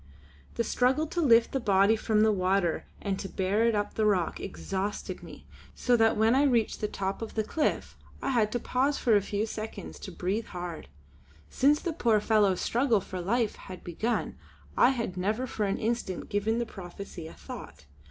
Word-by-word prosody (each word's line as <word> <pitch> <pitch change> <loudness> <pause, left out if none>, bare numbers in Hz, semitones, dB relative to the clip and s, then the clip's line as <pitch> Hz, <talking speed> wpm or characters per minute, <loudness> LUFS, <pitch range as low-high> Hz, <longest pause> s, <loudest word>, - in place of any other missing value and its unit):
The 235 - +1
struggle 260 +6 +2
to 340 +2 -2
lift 235 -6 +5
the 270 - 0
body 200 -1 +4
from 220 -1 +1
the 220 - +5
water 185 -3 +1 0.2
and 195 -2 -1
to 195 - -5
bear 205 +4 +1
it 230 - +2
up 205 0 -1
the 215 - +1
rock 185 -5 +1
exhausted 195 +1 -4
me, - - -12 0.3
so 245 - +2
that 225 -1 +3
when 220 +2 +4
I 270 - +4
reached 240 -6 +2
the 210 - +1
top 195 0 -3
of 225 - -6
the 220 - +1
cliff 300 +8 -1 0.2
I - - -2
had 220 -4 +2
to 245 - 0
pause 270 +5 0
for 230 -3 +3
a 205 - +4
few 205 +2 -2
seconds 220 0 -7
to 190 - -8
breathe 190 +6 -2
hard. 175 -2 -6 0.6
Since 290 +3 +3
the 340 - -2
poor 230 -8 +3
fellow's 205 -3 +2
struggle 240 -2 +2
for 185 -1 -6
life 225 +4 0
had 185 -1 -10
begun 215 +8 -2 0.4
I 245 - +6
had 230 -8 -2
never 210 +7 0
for 215 -4 -2
an 195 - 0
instant 225 -5 -2
given 210 +3 0
the 235 - 0
prophecy 180 -4 -9
a - - -10
thought. 75 +1 -10
215 Hz, 195 wpm, -29 LUFS, 195-235 Hz, 0.6 s, I